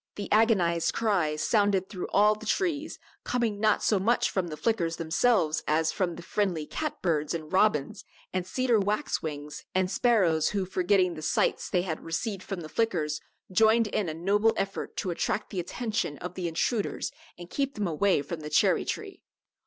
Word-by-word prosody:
The 205 - -6
agonized 195 -7 +3
cries 175 -9 +1
sounded 200 -4 +2
through 185 -3 -5
all 210 +1 +4
the 215 +1 -9
trees, 320 - -1 0.3
coming 235 -4 -1
not 215 0 +2
so 205 - +3
much 230 +6 +2
from 185 -3 -1
the 155 -2 -6
Flickers 175 -7 0
themselves 165 0 +1
as 160 +1 +2
from 180 -4 -1
the 175 - -9
friendly 180 -5 -1
cat 310 - -4
birds 155 -3 0
and 155 0 -7
robins 195 -1 +2 0.3
and 185 -1 0
cedar 250 0 +2
waxwings 155 - -2
and 185 0 +1
sparrows 185 -10 +3
who, 200 -2 -1
forgetting 185 0 +2
the 155 - -8
slights - - 0
they 180 -1 +1
had 160 -4 -4
received 190 +4 -3
from 190 -2 -5
the 155 - -7
Flickers, 155 -10 -1 0.3
joined 220 +4 +4
in 195 -3 -1
a - - -3
noble 205 +6 +2
effort 195 0 -3
to 185 - -1
attract 180 +4 -2
the 190 - -3
attention 195 -4 -2
of 180 +4 -6
the 180 -2 -3
intruders 200 +6 -1 0.3
and 175 0 -11
keep 275 -1 -1
them 210 - -1
away 175 -1 +2
from 165 +3 -5
the 150 -1 -7
cherry 150 0 +3
tree. - - -5
185 Hz, 180 wpm, -28 LUFS, 165-215 Hz, 0.3 s, all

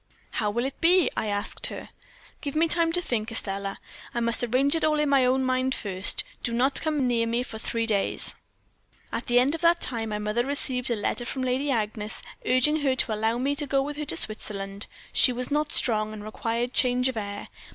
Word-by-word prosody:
"'How 210 - 0
will 235 +4 -1
it 270 - -6
be?' 355 +1 +4
I 220 - -1
asked 205 0 -2
her. - - -7 0.5
"'Give 285 -1 -4
me 325 +2 +3
time 330 0 +2
to 355 - +2
think, 225 -6 -2
Estelle; 195 -2 +2 0.4
I - - +1
must 235 +1 0
arrange 255 +4 +2
it 325 - 0
all 305 -1 +2
in 300 -1 +1
my 275 -2 +4
own 260 +1 +2
mind 255 0 +1
first. 190 -2 -1 0.2
Do 235 - -2
not 260 +4 +3
come 305 -4 0
near 230 -2 +1
me 235 +2 0
for 220 -3 -8
three 230 0 -2
days.' 205 -3 -1 0.8
"At 235 - -4
the 240 - +3
end 260 +4 +4
of 325 - -2
that 340 0 +4
time 230 -6 -2
my 210 - -2
mother 210 +3 -1
received 260 -2 +2
a 235 - +1
letter 215 +3 -2
from 260 +2 -3
Lady 255 +3 0
Agnes, 215 -3 -1 0.2
urging 255 +5 +3
her 275 -4 +1
to 245 -3 0
allow 220 +2 0
me 275 +3 0
to 295 -1 -3
go 275 0 +2
with 295 +1 -5
her 300 - -3
to - - -1
Switzerland; 200 -2 -2 0.3
she 255 - +6
was 250 +3 -3
not 300 +1 0
strong, 215 -2 0
and 210 -1 -8
required 230 +3 -3
change 250 0 +3
of 260 - -2
air. 205 -1 -5
245 Hz, 220 wpm, -26 LUFS, 220-280 Hz, 0.8 s, she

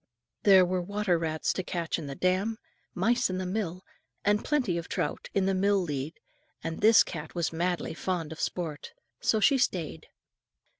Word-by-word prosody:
There 190 -3 +7
were 180 0 0
water 200 -1 0
rats 160 -1 -1
to - - -2
catch 170 -2 -2
in 150 - -6
the 140 - -5
dam, 190 +6 +1 0.4
mice 235 +6 +2
in 185 - -2
the 185 - -3
mill, 185 -2 -3 0.4
and 205 +1 +3
plenty 260 - +1
of 165 - -8
trout - - -2
in 195 -1 +3
the 195 - +2
mill 200 +2 +3
lead, 150 -3 -4 0.4
and 165 0 -4
this 220 +1 +7
cat 155 -1 -7
was 170 -2 -1
madly 175 0 -1
fond 170 -2 -3
of 160 - -7
sport, 160 -5 -4 0.3
so 220 - +2
she 275 +5 +4
stayed. 180 - -1
185 Hz, 180 wpm, -29 LUFS, 165-205 Hz, 0.4 s, There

